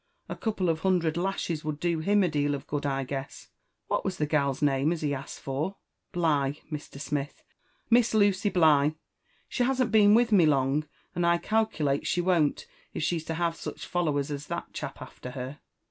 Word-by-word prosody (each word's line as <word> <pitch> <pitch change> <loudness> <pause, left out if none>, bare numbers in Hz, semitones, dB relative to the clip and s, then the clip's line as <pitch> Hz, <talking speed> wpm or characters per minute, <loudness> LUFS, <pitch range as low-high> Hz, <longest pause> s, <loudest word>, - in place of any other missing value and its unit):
A - - -5
couple 210 -5 -1
of 160 -1 +1
hundred 175 -3 +1
lashes 175 -3 -2
would 155 -1 -3
do 170 -1 0
him 200 +5 +3
a - - +3
deal 145 -2 0
of 140 - -8
good, 145 -1 -2
I 135 -1 -1
guess. 135 +1 -6 0.4
What - - -1
was 190 -1 -2
the 150 - +1
gal's 140 -3 +1
name 145 +1 +2
as 170 -2 -3
he 145 -1 +1
asked 135 0 -6
for?" 150 +8 -3 0.4
<*Bligh, 145 -5 +1 0.2
Mr. 150 -2 -7
Smith; 145 0 -4 0.5
Miss 235 -1 +4
Lucy 205 -1 +3
Bligh. 155 -5 +4 0.5
She - - -3
hasn't 255 -2 +2
beea 210 -2 +6
with 235 0 +3
me 180 -6 +6
long, 140 +1 +2 0.3
and 175 - -1
I 170 0 +4
calculate 170 -10 0
she 180 - +1
won't, 175 -5 +2 0.3
if - - -2
she's 165 -1 -1
to 160 - -3
have 170 0 0
such - - -7
followers 150 -5 0
as 145 0 -5
that - - -5
chap - - -6
after 125 - -10
her. 130 +2 -6
155 Hz, 190 wpm, -28 LUFS, 145-185 Hz, 0.5 s, beea